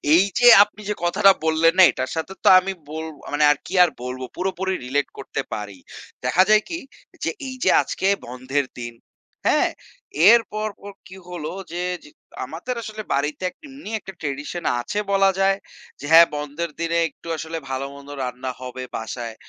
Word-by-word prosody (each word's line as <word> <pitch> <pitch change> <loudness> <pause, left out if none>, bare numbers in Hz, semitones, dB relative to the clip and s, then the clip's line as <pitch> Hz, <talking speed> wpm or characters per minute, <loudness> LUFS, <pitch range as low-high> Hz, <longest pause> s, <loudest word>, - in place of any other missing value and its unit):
এই 180 - +6 0.2
যে 245 - +6 0.2
আপনি 210 0 -12
যে - - +1
কথাটা 195 +3 +5
বললেন 160 +1 +4
না 185 - +10
এটার 130 0 -4
সাথে 160 +4 -4
তো - - +1
আমি 195 +1 -3 0.2
বল 160 +1 -5 0.2
আ - - -7
মানে 150 +1 +2
আরকি 150 +5 -4
আর 175 - +3
বলবো 130 0 -5
পুরোপুরি 190 0 -2
রিলেট 140 +3 0
করতে - - -4
পারি। 100 -2 -6 0.5
দেখা 185 - +4
যায় 215 0 +5
কি 335 - -3 0.4
যে - - +1 0.2
এই 260 - -6
যে - - +4
আজকে 190 - -2 0.2
বন্ধের 130 +3 -2
দিন। 120 -1 -6 0.6
হ্যাঁ, - - +3 0.6
এর 235 +1 +8
পরপর 215 -1 -5 0.2
কি 190 0 -12
হলো 165 -3 -5 0.2
যে, 175 +1 -3 0.2
যে 150 - -14 0.4
আমাদের 175 - -5
আসলে 215 0 -6
বাড়িতে 150 +6 -1
এক - - -20
এমনি 270 -5 -10
একটা 195 - -10
ট্র্যাডিশন 145 +4 -4 0.2
আছে 205 +12 -3
বলা 195 0 +4
যায়। 195 0 +3 0.4
যে 145 - -8
হ্যাঁ, 165 +1 +9
বন্ধের 150 +3 -4
দিনে 170 0 0
একটু 170 - -17
আসলে 160 +1 -5
ভালো-মন্দ 140 +2 -6
রান্না 125 +1 -4
হবে 130 0 -6
বাসায়। 115 0 -6
165 Hz, 175 wpm, -22 LUFS, 140-195 Hz, 0.6 s, না